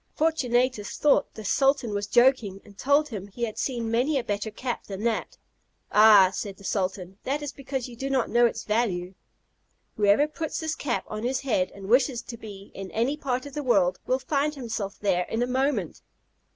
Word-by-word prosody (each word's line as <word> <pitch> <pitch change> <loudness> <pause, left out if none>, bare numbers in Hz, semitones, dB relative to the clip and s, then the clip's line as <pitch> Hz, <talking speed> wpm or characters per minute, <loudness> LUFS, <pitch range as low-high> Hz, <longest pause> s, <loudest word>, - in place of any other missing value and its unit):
Fortunatus 255 -8 +1
thought 290 -1 +3
the 215 - -8
sultan 270 -1 +2
was 205 0 -2
joking, 240 -4 +3
and 205 -2 -16
told 285 +7 +2
him 200 -5 -6
he 220 +4 -7
had 220 -2 -3
seen 235 -4 -2
many 260 +6 +2
a 255 - -1
better 205 -1 -2
cap 245 +3 -4
than 195 +1 -6
that. 230 -2 -1 0.5
"Ah!" 210 -3 +7
said 195 -1 -5
the 200 - -15
sultan, 190 -1 -3
"that 290 +3 -2
is 290 - -4
because 270 -2 -5
you 245 - -10
do 270 +4 -4
not 265 -3 +1
know 240 0 +4
its - - -5
value. 195 -5 -1 0.8
Whoever 210 +7 +4
puts 310 0 -4
this 315 -1 -2
cap 270 -5 -2
on 215 0 -5
his 250 +3 -1
head, 210 -9 0
and 195 -1 -9
wishes 245 +1 +3
to 235 - -8
be 200 -3 -11
in 195 -1 -7
any 235 +8 0
part 255 -3 -2
of 285 - -9
the 295 - -3
world, 190 -9 +2
will 255 - +2
find 285 +3 -1
himself 225 -6 -4
there 180 -3 +1
in 225 +2 0
a - - +2
moment." 255 - -1
235 Hz, 200 wpm, -26 LUFS, 205-270 Hz, 0.8 s, Ah